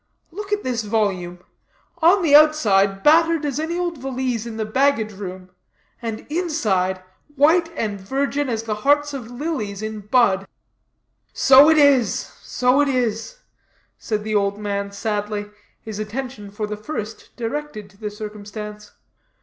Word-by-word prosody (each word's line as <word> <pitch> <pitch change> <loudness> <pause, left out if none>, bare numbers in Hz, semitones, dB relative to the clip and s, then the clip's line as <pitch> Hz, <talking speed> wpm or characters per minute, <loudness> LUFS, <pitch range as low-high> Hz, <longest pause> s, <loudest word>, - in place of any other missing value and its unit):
Look 410 +4 -7
at 415 0 0
this 245 -3 -1
volume; 195 -5 -1 0.6
on 355 +4 +5
the 300 -4 +2
outside, 205 -11 +4
battered 325 0 +4
as 285 -1 -2
any 325 +2 -2
old 345 -4 -2
valise 255 -3 -3
in 225 -1 -7
the 220 - -2
baggage 230 -1 +1
room; 185 -2 -8 0.5
and 225 -2 -5
inside, 215 - -1 0.3
white 325 +4 +4
and 205 -3 -3
virgin 275 +6 -1
as 225 -2 -2
the 220 -2 -2
hearts 290 +2 +2
of 250 -5 -6
lilies 245 -7 -4
in 215 0 -4
bud." 205 -3 +2 0.9
"So 275 +3 +7
it 320 - +5
is, 275 -7 +5 0.3
so 250 +3 +2
it 290 - +2
is," 250 - -2 0.6
said 210 -2 -3
the 215 0 -3
old 200 -1 +1
man 200 -1 -3
sadly, 205 0 -3 0.3
his 215 -2 -7
attention 215 0 -5
for 210 +2 -4
the 210 0 -5
first 215 -2 -6
directed 245 -2 -5
to 195 - -23
the 210 0 -4
circumstance. 210 0 -8
225 Hz, 150 wpm, -21 LUFS, 210-290 Hz, 0.9 s, So